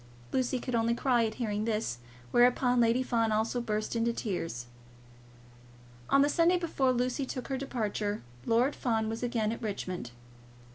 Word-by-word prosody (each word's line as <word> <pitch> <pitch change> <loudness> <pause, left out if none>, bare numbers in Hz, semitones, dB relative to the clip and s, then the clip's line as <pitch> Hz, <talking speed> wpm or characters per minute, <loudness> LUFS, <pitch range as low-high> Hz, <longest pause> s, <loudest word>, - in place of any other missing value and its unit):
Lucy 255 0 +1
could 250 0 -5
only 230 0 +2
cry 240 -2 +2
at 215 - -6
hearing 215 -3 -2
this; 215 - -1 0.3
whereupon 245 - +4
Lady 235 +2 +3
Fawn 230 -3 +1
also 220 +3 0
burst 215 -1 -2
into 230 0 +2
tears. 165 - -3 1.4
On 275 - +5
the - - +4
Sunday 335 +4 +3
before 310 -7 +1
Lucy 250 +2 0
took 255 0 -5
her 270 - 0
departure, 215 -5 -2 0.2
Lord 245 +5 +3
Fawn 225 -3 0
was 225 0 -4
again 235 -3 0
at 230 - -5
Richmond. 185 - -4
235 Hz, 155 wpm, -30 LUFS, 215-255 Hz, 1.4 s, On